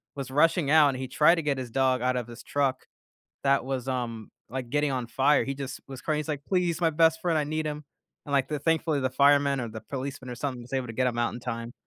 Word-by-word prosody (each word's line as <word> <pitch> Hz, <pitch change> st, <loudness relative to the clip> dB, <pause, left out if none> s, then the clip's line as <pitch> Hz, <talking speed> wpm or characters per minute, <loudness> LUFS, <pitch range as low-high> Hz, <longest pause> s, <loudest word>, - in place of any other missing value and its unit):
was 135 Hz, -2 st, -5 dB
rushing 155 Hz, +1 st, +3 dB
out 155 Hz, -2 st, +7 dB
and 130 Hz, -, -3 dB
he 130 Hz, 0 st, -4 dB
tried 150 Hz, +6 st, +4 dB
to 165 Hz, -, -1 dB
get 140 Hz, -2 st, 0 dB
his 125 Hz, -3 st, -5 dB
dog 130 Hz, -1 st, +2 dB
out 130 Hz, 0 st, +1 dB
of 120 Hz, -1 st, -3 dB
his 120 Hz, -, -11 dB
truck 135 Hz, -2 st, -1 dB, 0.6 s
that 140 Hz, -1 st, +3 dB
was, 135 Hz, -1 st, -3 dB
um, 115 Hz, -4 st, -3 dB, 0.2 s
like, 130 Hz, -1 st, -4 dB
getting 145 Hz, -1 st, +1 dB
on 125 Hz, -2 st, -2 dB
fire. 135 Hz, +5 st, +3 dB
He 135 Hz, -, -3 dB
just 135 Hz, -1 st, -6 dB
was 130 Hz, -2 st, -8 dB
crying, 155 Hz, -1 st, 0 dB
he's, 155 Hz, -, -4 dB
like, 145 Hz, -2 st, -3 dB
"Please 180 Hz, -3 st, 0 dB
my 165 Hz, -1 st, +3 dB
best 160 Hz, +1 st, +3 dB
friend, 165 Hz, -3 st, +1 dB
I 150 Hz, -, +1 dB
need 155 Hz, +1 st, -2 dB
him," 150 Hz, 0 st, -4 dB, 0.4 s
and, 140 Hz, -, -5 dB
like, 135 Hz, -1 st, +2 dB
the 150 Hz, -1 st, -2 dB
thankfully 160 Hz, -1 st, +1 dB
the 130 Hz, -, +1 dB
fireman 140 Hz, -1 st, +4 dB
or 120 Hz, -, -4 dB
the 110 Hz, 0 st, -8 dB
policeman 135 Hz, 0 st, -6 dB
or -, -, -4 dB
something 130 Hz, -3 st, -3 dB
was 125 Hz, +3 st, -8 dB
able 130 Hz, -2 st, -1 dB
to -, -, -5 dB
get 130 Hz, +1 st, +1 dB
him 120 Hz, -, -4 dB
out 120 Hz, -, +1 dB
in 120 Hz, -, -7 dB
time. 115 Hz, -1 st, -5 dB
135 Hz, 270 wpm, -27 LUFS, 125-150 Hz, 0.6 s, out